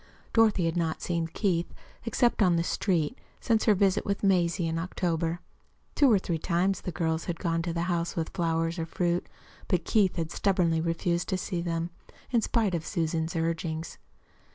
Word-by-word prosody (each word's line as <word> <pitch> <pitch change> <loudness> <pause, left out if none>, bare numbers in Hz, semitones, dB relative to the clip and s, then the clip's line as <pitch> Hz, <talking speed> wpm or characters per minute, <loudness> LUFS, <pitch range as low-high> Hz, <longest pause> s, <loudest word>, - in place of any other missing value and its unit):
Dorothy 215 -6 +4
had 165 0 0
not 165 -2 -1
seen 170 -2 -1
Keith, 175 -1 -1 0.3
except 235 0 +2
on 180 -4 +5
the 165 - +1
street, 175 - 0 0.2
since 225 -3 +1
her 215 - +5
visit 195 -1 +2
with 200 0 -2
Mazie 175 -3 +2
in 165 0 -1
October. 170 -1 -1 0.5
Two 280 -4 +5
or 210 - +6
three 170 -3 -2
times 180 +3 0
the 180 - -4
girls 160 -1 -1
had 175 -2 -3
gone 165 -2 0
to 170 0 -2
the 170 0 -1
house 170 -1 -1
with 160 -1 -2
flowers 165 0 -1
or 165 - -2
fruit, 175 +1 0 0.4
but 175 -2 0
Keith 205 -5 +3
had 165 -1 -2
stubbornly 175 -5 +1
refused 170 +1 -1
to 185 - +1
see 180 -1 -3
them, 170 0 -2 0.4
in 235 -2 +3
spite 215 -3 +1
of 165 -2 -1
Susan's 165 0 -1
urgings. 165 0 -2
170 Hz, 180 wpm, -28 LUFS, 165-190 Hz, 0.5 s, or